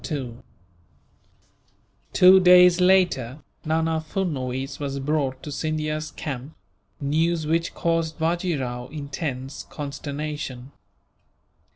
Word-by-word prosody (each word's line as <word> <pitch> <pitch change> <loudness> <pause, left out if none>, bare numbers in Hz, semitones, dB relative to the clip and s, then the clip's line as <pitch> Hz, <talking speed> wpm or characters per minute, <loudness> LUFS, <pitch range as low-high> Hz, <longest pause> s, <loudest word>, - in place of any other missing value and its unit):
Two 185 +1 +7
days 180 -1 +7
later, 175 -8 +2 0.2
Nana 160 0 0
Furnuwees 135 -6 -3
was 140 -1 -3
brought 135 -2 -1
to 150 - -6
Scindia's 155 0 -2
camp 140 0 -6 0.4
news 160 +3 0
which 165 +2 0
caused 165 -1 0
Bajee 170 0 0
Rao 125 -1 -4
intense 140 -2 -5
consternation. 145 -2 -5
155 Hz, 85 wpm, -24 LUFS, 140-165 Hz, 0.4 s, Two